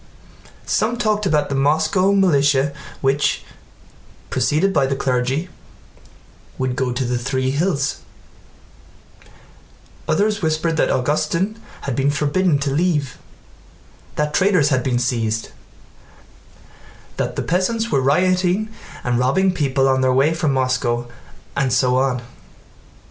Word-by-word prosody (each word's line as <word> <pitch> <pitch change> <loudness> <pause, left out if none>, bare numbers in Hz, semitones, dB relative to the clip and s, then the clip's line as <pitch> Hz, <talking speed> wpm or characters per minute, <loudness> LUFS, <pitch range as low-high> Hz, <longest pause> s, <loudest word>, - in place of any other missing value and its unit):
Some 230 +3 0
talked 215 -3 0
about 150 -4 +1
the - - -2
Moscow 155 +7 +2
militia 145 -7 +3 0.3
which, 135 +2 +1 0.9
preceded 150 +10 +1
by 135 - +2
the 135 - -1
clergy, 130 +5 -1 1.1
would 130 -1 -1
go 130 -1 -1
to 125 +1 -2
the 120 0 -1
Three 130 +1 -1
Hills; 145 -2 0 2.1
others 205 +6 +1
whispered 160 0 0
that - - +2
Augustin 165 - 0 0.2
had 135 - -3
been 135 +2 +1
forbidden 150 +3 +1
to 140 -1 -1
leave, 150 -4 0 1.0
that 150 0 -1
traitors 185 -6 +3
had 130 -3 +1
been 125 -1 0
seized, 115 -3 -1 1.7
that - - -2
the - - -2
peasants 220 +6 0
were 135 - +2
rioting 185 +8 +2 0.3
and 120 -1 0
robbing 180 +10 +2
people 135 -5 +1
on 130 0 +2
their 130 0 +3
way 140 +5 +3
from 160 -3 0
Moscow, 125 -2 0 0.5
and 135 -2 0
so 125 0 +2
on. 130 -2 0
145 Hz, 120 wpm, -20 LUFS, 130-180 Hz, 2.1 s, militia